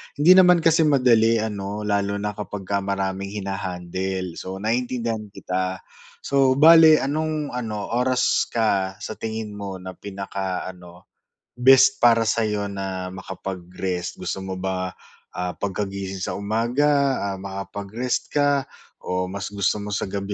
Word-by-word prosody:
hindi 155 +5 +5
naman 180 -2 +7
kasi 165 -1 +4
madali 120 -5 +4
ano, 105 -1 -4
lalo 100 -1 0
na 105 +1 -2
kapagka 100 -1 -4
maraming 95 0 -3
hina-handle. 95 -2 -4
So, 95 0 -6
naintindihan 115 -1 -1
kita. 95 -1 -3 0.4
So, 135 -1 +3
bale 160 +1 +7
anong 155 +1 -2
ano 110 -4 -4
oras 125 +1 +2
ka 100 -4 0
sa - - -5
tingin 110 -1 -4
mo 100 -1 -5
na 95 0 -8
pinaka-ano, 95 -2 -6 0.5
best 135 +1 +6
para 115 -2 +4
sa'yo 105 -3 0
na 95 -2 -4
makapag-rest? 95 -1 -5
Gusto - - -3
mo 95 - -4
ba, 95 0 -3 0.4
ah, 90 0 -3
pagkagising 95 -1 -4
sa - - -3
umaga, 130 +7 +1 0.2
ah, 95 - -6
makapag-rest 100 +5 -4
ka 145 -2 +2 0.4
o 90 0 -2
mas 100 +1 -5
gusto 100 0 0
mo 105 - -6
sa 100 - -1
gabi 100 +1 -3
100 Hz, 135 wpm, -23 LUFS, 95-120 Hz, 0.5 s, naman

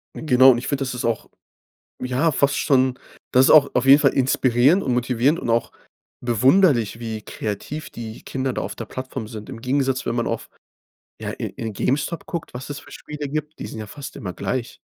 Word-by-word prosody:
Genau 130 -3 +5
und 120 - +2
ich 120 - -5
finde, 140 -1 -1
das 125 - -3
ist 125 - -3
auch, 115 -2 -1 0.7
ja 130 +6 +1
fast 140 0 +2
schon 130 -3 +2 0.4
das 130 +1 +6
ist - - +4
auch 145 -2 +7
auf 125 - +2
jeden 140 +2 +9
Fall - - +3
inspirierend 130 +5 +3
und 125 -2 +1
motivierend 125 +6 +1
und - - -2
auch 115 0 +1 0.5
bewunderlich, 120 - +3
wie 110 -2 -5
kreativ 110 +11 -5
die 115 -1 -8
Kinder 130 -1 -2
da - - -3
auf - - -5
der - - -5
Plattform 130 -2 -6
sind. 110 +1 -8
Im 120 -4 -8
Gegensatz, 135 0 0
wenn 115 - 0
man 120 -1 -1
auf - - -4 0.7
ja, - - -3
in - - -5
in 110 -2 -5
Gamestop 150 - -1
guckt, 170 -1 -5
was 125 +3 -7
es 145 - -5
für - - -16
Spiele 150 -1 -6
gibt, 155 +1 -4
die - - -5
sind 110 - -8
ja 110 - -6
fast 140 +4 -9
immer 90 -4 -5
gleich. 125 +7 -3
130 Hz, 210 wpm, -22 LUFS, 120-140 Hz, 0.7 s, jeden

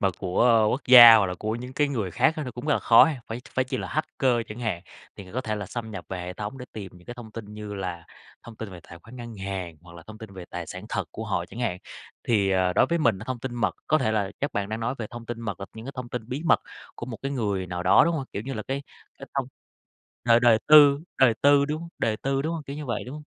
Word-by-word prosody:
mà 100 - +3
của 110 +4 +3
quốc 135 - -1
gia 120 -2 +11
hoặc 100 -3 +3
là 90 - -3
của 110 +4 -3
những 125 +2 -7
cái 145 +2 +1
người 110 -9 -2
khác 130 - +3
á 155 - -3
nó 125 - -5
cũng 125 +4 -8
rất 150 - +3
là - - +1
khó 115 - +7
ha. 145 -6 -2
Phải 115 +2 -5
phải 130 - +2
chi 130 - -3
là - - -5
hacker 140 -4 0
chẳng 105 +3 -9
hạn, 100 -7 -2 0.3
thì 100 - -9
người 95 - -14
có 130 - -1
thể 110 -3 -3
là 100 -2 -5
xâm 115 0 -6
nhập 100 -5 -7
về 95 -1 -4
hệ 90 +1 -5
thống 105 +7 -6
để 125 - -7
tìm 100 -4 -8
những 90 0 -17
cái 120 - -7
thông 120 -3 -10
tin 115 -2 -7
như 105 -1 -7
là 90 -3 -5 0.4
thông 115 -2 -12
tin 110 -3 -7
về 90 -2 -10
tài 85 - -11
khoản 115 +8 -14
ngân 120 -2 -8
hàng, 95 -4 -5
hoặc 85 -1 -15
là 85 - -11
thông 110 0 -11
tin 110 -3 -10
về 90 -2 -8
tài 85 -2 -5
sản 95 +3 -8
thật - - -2
của - - -6
họ - - -1
chẳng 120 - -9
hạn. 95 -7 -1 0.5
Thì, 100 -5 +3
ờ, 95 -1 +2
đối - - +4
với 170 0 0
mình 115 -10 +2
thông 130 -2 -3
tin 125 0 -6
mật 105 -7 0
có 155 - +3
thể 110 -5 0
là 100 -3 0
chắc 145 - -2
bạn 100 0 -2
đang 110 +1 -4
nói 125 +3 -1
về 110 - -4
thông 120 0 -9
tin 120 -1 -5
mật 105 -5 -5
là 95 - -5
những 110 +1 -9
cái 135 - -6
thông 125 -1 -5
tin 120 -2 -6
bí 130 +5 -4
mật 165 - +4 0.3
của 120 - -7
một 115 -3 -6
cái 135 +1 -2
người 100 -7 -1
nào 90 0 -4
đó, 90 - +6
đúng 170 - +1
hông? 140 -4 -2
Kiểu, 100 - -4
như 135 +2 -5
là 110 - -4
cái 135 +4 -4 0.4
cái - - -9
thông - - -1 0.8
đời 115 -1 +6
đời 120 -2 +5
tư 145 -2 +8 0.2
đời 125 -4 +5
tư, 140 0 +5
đúng 150 +1 -3
hông? 170 - -9
Đời 110 -1 0
tư, 135 +2 -1
đúng 160 +3 -2
hông? 160 -3 -5
Kiểu 140 - -7
như 150 0 -6
vậy, 120 - -3
đúng 125 - -8
hông? 150 - -9
115 Hz, 305 wpm, -25 LUFS, 100-130 Hz, 0.8 s, gia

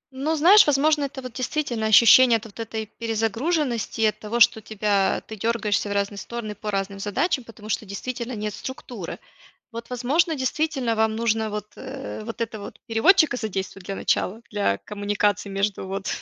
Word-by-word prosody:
Ну, 305 +4 0
знаешь, 365 +5 +7
возможно, 295 +1 +3
это 265 -1 -7
вот 250 -2 -7
действительно 255 -4 -2
ощущение 230 +3 +7
от 225 - -12
вот 225 +1 -13
этой 220 -1 -4
перезагруженности 230 - -1
и - - +5
от 215 0 +1
того, 225 +3 -3
что 220 -1 +5
тебя 205 -2 0
ты 220 - -7
дергаешься 210 -1 0
в - - -4
разные 200 0 -1
стороны 235 -3 -6
по 210 +1 -6
разным 195 0 -2
задачам, 240 - 0
потому 220 -2 -13
что 215 - -2
действительно 240 +4 -5
нет 210 -1 -4
структуры. 245 -8 -7 0.5
Вот, 230 0 -7
возможно, 285 +7 +1
действительно 265 -3 -1
вам 220 0 +1
нужно 220 -1 0
вот, 210 0 -4
э, 265 -4 -7
вот 230 0 -6
этого 215 -2 -4
вот - - -11
переводчика 310 - +4
задействовать 195 -4 -5
для 195 - -4
начала, 220 +5 -1
для 200 - 0
коммуникации 205 -1 -1
между 195 0 -1
вот 195 0 -4
225 Hz, 175 wpm, -24 LUFS, 205-255 Hz, 0.5 s, знаешь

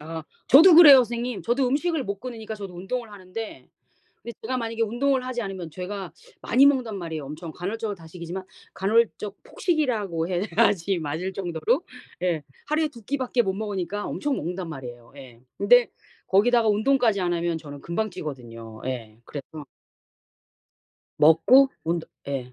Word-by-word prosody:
아 160 +1 -6 0.2
저도 320 +7 +8
그래요, 295 -5 +10
선생님. 240 -1 -1
저도 250 +3 +1
음식을 300 +1 0
못 200 0 -4
끊으니까 225 -3 -6
저도 200 -4 -8
운동을 225 +5 -4
하는데 205 +3 -8 0.5
근데 235 - -8
제가 255 +3 -2
만약에 230 -1 -3
운동을 255 +4 0
하지 255 -2 -3
않으면 190 -5 -5
제가 185 0 -6 0.3
많이 265 +3 +4
먹는단 255 -7 +2
말이에요. 160 -5 -5
엄청 155 +3 -7
간헐적 205 +4 -4
단식이지만 170 +2 -8 0.3
간헐적 210 0 0
폭식이라고 215 - -1
해야지 195 0 +1
맞을 160 +5 -3
정도로 185 - -1 0.4
예 170 -4 0 0.2
하루에 305 +1 +1
2 235 -6 -14
끼밖에 255 0 0
못 190 - -1
먹으니까 205 -1 -3
엄청 290 -2 -2
먹는단 175 +2 -4
말이에요. 120 -4 -9
예. 130 -4 -13 0.2
근데 240 +4 +5 0.4
거기다가 230 +4 +4
운동까지 220 -1 +2
안 175 -1 0
하면 170 -1 -1
저는 145 -3 -10
금방 215 +6 -2
찌거든요. 115 -8 -8
예 115 -4 -5
그래서 150 +1 -8 1.5
먹고 165 - +6 0.2
운동 165 0 -2 0.2
예. 130 -3 -4
200 Hz, 350 characters per minute, -25 LUFS, 165-240 Hz, 1.5 s, 그래요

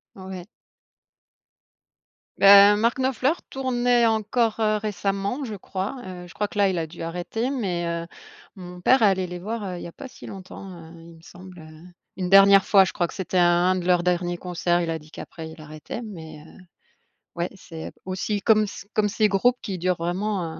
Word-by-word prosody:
Ouais. 185 -1 -8 1.9
Beh, 200 +1 +8
Mark 230 +4 +1
Knopfler, 260 +3 +1 0.2
tournait 245 -2 +1
encore, 225 +1 0
heu, 215 -1 +2
récemment 200 +4 -2
je 220 -4 -5
crois. 190 +6 -5
Heu, 180 -1 -8
je - - -14
crois 210 -1 -2
que - - -14
là, 200 -1 +4
il 180 - -2
a 160 - -2
dû 165 +1 -10
arrêter 180 +9 -3
mais, 185 -10 -2
heu, 170 0 -3 0.5
mon 180 -1 -10
père 255 +6 +4
allait 190 -3 +3
les 180 0 -7
voir, 215 +4 -5
heu, 180 -2 -5
il - - -8
y 170 - -7
pas 270 - -10
si - - -13
longtemps, 195 0 -10
heu, 165 -2 -12 0.2
il 165 - -15
me - - -18
semble, 180 +1 -13
heu. 155 0 -14 0.3
Une 180 -1 -3
dernière 195 0 +7
fois 195 -2 +6
je - - -4
crois 175 - 0
que - - -11
c'était 185 -1 -2
un 175 0 +4
un 185 - +2
de 175 - -4
leurs 180 -1 +3
derniers 175 0 0
concerts, 175 -1 -1
il 165 -1 -2
a 160 - -2
dit 150 0 -18
qu'après, 160 -1 -9
il 160 0 -13
arrêtait 155 +9 -8
mais 160 -8 -9
heu, - - -16 0.8
ouais 170 +1 -2
c'est 165 -4 -9
aussi 190 +2 -2
comme 215 -1 +4
c 195 - -9
comme 210 -1 +2
c'est 215 +1 +2
groupes 245 +6 +2
qui 195 -5 -4
durent 180 0 0
vraiment, 175 0 -2
190 Hz, 200 wpm, -24 LUFS, 175-215 Hz, 1.9 s, Beh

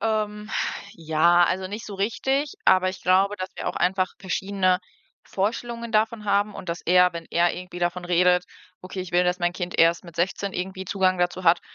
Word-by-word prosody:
Ähm. 215 -1 -2 0.4
Ja, 170 +2 +3
also, 185 +2 -1
nicht 210 +4 -7
so 205 - -7
richtig, 265 - -1
aber 185 0 +4
ich 185 - -6
glaube, 195 +3 +3
dass 185 -1 -4
wir - - -3
auch - - -5
einfach 185 0 0
verschiedene 190 -1 0 0.5
Vorstellungen 235 +3 -3
davon 215 0 +1
haben 205 +1 +1
und 185 - -9
dass 170 0 -3
er, 180 0 +4
wenn 170 -1 -7
er 170 +1 +2
irgendwie 180 0 -8
davon 175 +1 -2
redet: 180 0 +3 0.4
„Okay, 185 +1 -7
ich 180 -1 -7
will, 180 +1 +3
dass 180 +1 0
mein 175 0 0
Kind 180 -1 -5
erst 170 +1 +4
mit 170 -1 -13
16 190 +3 -1
irgendwie 190 +1 -4
Zugang 185 -1 +1
dazu 180 +1 -1
hat.“, 170 +1 +5
185 Hz, 195 wpm, -24 LUFS, 175-200 Hz, 0.5 s, hat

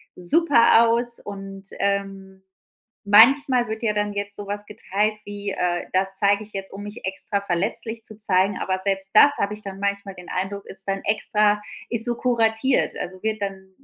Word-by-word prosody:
super 235 - +4
aus 235 +1 +1
und, 195 -1 -9
ähm, 195 -1 -3 0.7
manchmal 250 +3 +5
wird 220 +1 -5
ja 210 -2 +1
dann 210 0 -1
jetzt 200 0 -4
sowas 205 0 -6
geteilt 210 +1 -2
wie, 205 -1 -5
äh: 175 -1 -1
„Das 190 +1 +1
zeige 200 +1 +2
ich 210 - -17
jetzt, 195 0 -6
um 200 - -8
mich 205 0 -9
extra 190 +1 -2
verletzlich 200 +5 -2
zu 215 - -9
zeigen“, 195 -1 +1
aber 185 0 -2
selbst 195 0 -2
das 285 +6 +7
habe 200 +1 -1
ich 210 - -10
dann 195 -1 -8
manchmal 200 -1 -3
den 180 0 -12
Eindruck, 195 +2 -4
ist 195 +1 -3
dann 195 0 -2
extra 210 0 +1 0.3
ist 230 -1 +6
so 240 -1 -1
kuratiert. 235 +1 +1
Also 185 +1 -7
wird 215 -1 -2
dann 190 -1 -6
200 Hz, 180 wpm, -23 LUFS, 195-220 Hz, 0.7 s, das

